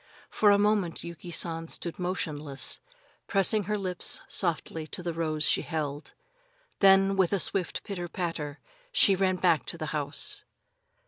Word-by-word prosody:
For 210 Hz, -, +4 dB
a 200 Hz, -, +6 dB
moment 205 Hz, -5 st, +1 dB
Yuki 170 Hz, 0 st, -8 dB
San 165 Hz, -1 st, -1 dB
stood 170 Hz, +1 st, -4 dB
motionless, 155 Hz, -6 st, -3 dB, 0.5 s
pressing 200 Hz, +1 st, +2 dB
her 210 Hz, +1 st, 0 dB
lips 185 Hz, -3 st, 0 dB
softly 165 Hz, -3 st, -1 dB
to 180 Hz, -, -1 dB
the 170 Hz, -1 st, -2 dB
rose 155 Hz, -2 st, -1 dB
she -, -, +3 dB
held. 150 Hz, -2 st, -4 dB, 0.6 s
Then, 195 Hz, 0 st, +6 dB
with 190 Hz, -3 st, +3 dB
a 200 Hz, -, +2 dB
swift 180 Hz, 0 st, -2 dB
pitter 180 Hz, -3 st, -5 dB
patter, 165 Hz, -4 st, -4 dB, 0.3 s
she 230 Hz, -, +5 dB
ran 185 Hz, 0 st, +2 dB
back 170 Hz, -6 st, +2 dB
to -, -, -4 dB
the -, -, -4 dB
house. -, -, 0 dB
175 Hz, 150 wpm, -28 LUFS, 160-195 Hz, 0.6 s, a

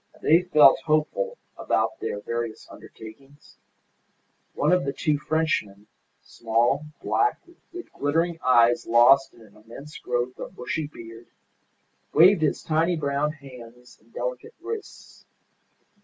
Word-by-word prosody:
They 165 Hz, +3 st, +4 dB
felt 155 Hz, -6 st, +5 dB
hopeful 155 Hz, -, -1 dB, 0.2 s
about 330 Hz, -, -1 dB
their 100 Hz, -, -4 dB
various 115 Hz, -1 st, -5 dB
undertakings. 135 Hz, +7 st, -15 dB, 1.0 s
One 150 Hz, -, +1 dB
of 180 Hz, 0 st, +3 dB
the 140 Hz, 0 st, -3 dB
two 150 Hz, 0 st, -1 dB
Frenchmen, 145 Hz, -11 st, -2 dB, 0.4 s
small, 120 Hz, +6 st, -1 dB, 0.2 s
black, 420 Hz, +1 st, +1 dB, 0.3 s
with 355 Hz, 0 st, -10 dB
glittering 165 Hz, +4 st, -1 dB
eyes 120 Hz, -2 st, +3 dB
lost 120 Hz, +4 st, +5 dB
in 115 Hz, -, -19 dB
an 105 Hz, -2 st, -20 dB
immense 115 Hz, +8 st, -12 dB
growth 125 Hz, +1 st, -3 dB
of -, -, -8 dB
bushy 145 Hz, +5 st, -4 dB
beard, 115 Hz, -4 st, -13 dB, 0.9 s
waved 180 Hz, +3 st, +6 dB
his 155 Hz, -, 0 dB
tiny 165 Hz, +2 st, +1 dB
brown 145 Hz, 0 st, -1 dB
hands 125 Hz, -4 st, -15 dB
and -, -, -28 dB
delicate -, -, -6 dB
wrists. 450 Hz, -2 st, -9 dB
145 Hz, 125 wpm, -24 LUFS, 120-160 Hz, 1.0 s, waved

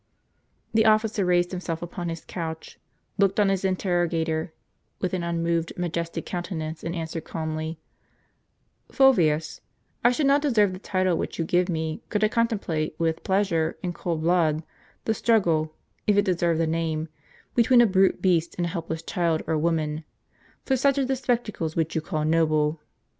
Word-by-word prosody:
The 220 Hz, 0 st, +4 dB
officer 215 Hz, -1 st, +3 dB
raised 175 Hz, -1 st, +2 dB
himself 175 Hz, -3 st, -4 dB
upon 175 Hz, 0 st, -5 dB
his 165 Hz, 0 st, -6 dB
couch, 160 Hz, -2 st, -6 dB, 0.4 s
looked 200 Hz, 0 st, +3 dB
on 205 Hz, -2 st, +4 dB
his 195 Hz, -1 st, 0 dB
interrogator 175 Hz, -3 st, 0 dB, 0.5 s
with 185 Hz, -, -2 dB
an 185 Hz, -, 0 dB
unmoved, 170 Hz, -1 st, -1 dB
majestic 170 Hz, -1 st, -3 dB
countenance, 165 Hz, -3 st, -4 dB
and 170 Hz, +1 st, -3 dB
answered 165 Hz, -1 st, -4 dB
calmly: 160 Hz, 0 st, -4 dB, 0.6 s
" -, -, -34 dB
Fulvius, 165 Hz, -, +3 dB, 0.4 s
I 240 Hz, -, +7 dB
should 280 Hz, +4 st, 0 dB
not 280 Hz, +1 st, +4 dB
deserve 215 Hz, -10 st, +3 dB
the 185 Hz, -, -7 dB
title 185 Hz, -2 st, 0 dB
which -, -, -4 dB
you 165 Hz, -, -1 dB
give 180 Hz, +2 st, +1 dB
me, 160 Hz, +2 st, -2 dB
could 210 Hz, -1 st, 0 dB
I 215 Hz, -, +4 dB
contemplate 200 Hz, -10 st, -1 dB
with 165 Hz, -1 st, -1 dB
jDleasure, 190 Hz, -5 st, +1 dB
in 180 Hz, -1 st, -2 dB
cold 170 Hz, -2 st, -3 dB
blood, 165 Hz, -2 st, +2 dB, 0.4 s
the 220 Hz, -, +2 dB
struggle, 165 Hz, -10 st, +1 dB, 0.3 s
if 205 Hz, -1 st, +4 dB
it 205 Hz, -, +4 dB
deserve 170 Hz, -3 st, +1 dB
the 165 Hz, -, +2 dB
name, 160 Hz, -1 st, -1 dB, 0.5 s
between 240 Hz, +1 st, +5 dB
a 240 Hz, -, +7 dB
brute 190 Hz, -2 st, +2 dB
beast 170 Hz, -3 st, +2 dB
and 175 Hz, -, 0 dB
a -, -, -2 dB
helpless 165 Hz, -2 st, -4 dB
child 170 Hz, -2 st, 0 dB
or 160 Hz, -, 0 dB
woman, 155 Hz, -1 st, 0 dB, 0.6 s
for 265 Hz, -, +2 dB
such 275 Hz, +2 st, +2 dB
are 275 Hz, -, +2 dB
the 265 Hz, +1 st, 0 dB
spectacles 235 Hz, -10 st, -2 dB
which 165 Hz, -1 st, 0 dB
you 160 Hz, -, 0 dB
call 155 Hz, -2 st, -2 dB
noble. 155 Hz, -1 st, +2 dB
170 Hz, 170 wpm, -25 LUFS, 160-195 Hz, 0.6 s, I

